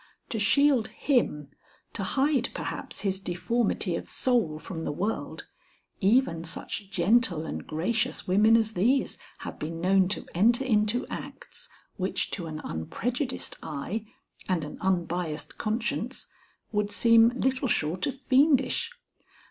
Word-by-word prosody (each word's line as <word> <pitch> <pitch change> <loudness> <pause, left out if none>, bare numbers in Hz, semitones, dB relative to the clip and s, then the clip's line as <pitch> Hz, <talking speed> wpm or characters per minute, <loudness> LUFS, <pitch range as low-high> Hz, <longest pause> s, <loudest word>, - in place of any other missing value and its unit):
To 225 - -2
shield 265 +2 +4
him, 150 - 0 0.4
to 205 - -4
hide 270 +5 +1
perhaps - - -5
his 190 -2 0
deformity 195 0 -1
of - - -3
soul 230 -12 +1
from 160 +1 -6
the - - -2
world, 205 +9 -3 0.5
even 195 -5 +2
such 180 +3 -5
gentle 190 -3 +3
and - - -6
gracious 180 +9 -1
women 210 +5 +5
as 220 -1 0
these 240 +9 +1 0.2
have - - -7
been 165 +2 -4
known 190 +1 +3
to 200 - -2
enter 235 +8 +3
into 215 0 +2
acts - - -8 0.3
which - - -1
to 175 -5 -3
an 155 0 -6
unprejudiced 245 - -3
eye 185 +9 -4 0.4
and 180 -4 +1
an 150 - -8
unbiased 175 -4 -2
conscience 230 +3 -2 0.5
would 210 -1 0
seem 230 +1 +5
little 260 +1 +1
short 175 -3 0
of 275 - -3
fiendish. 270 0 +3
210 Hz, 130 wpm, -27 LUFS, 175-240 Hz, 0.5 s, women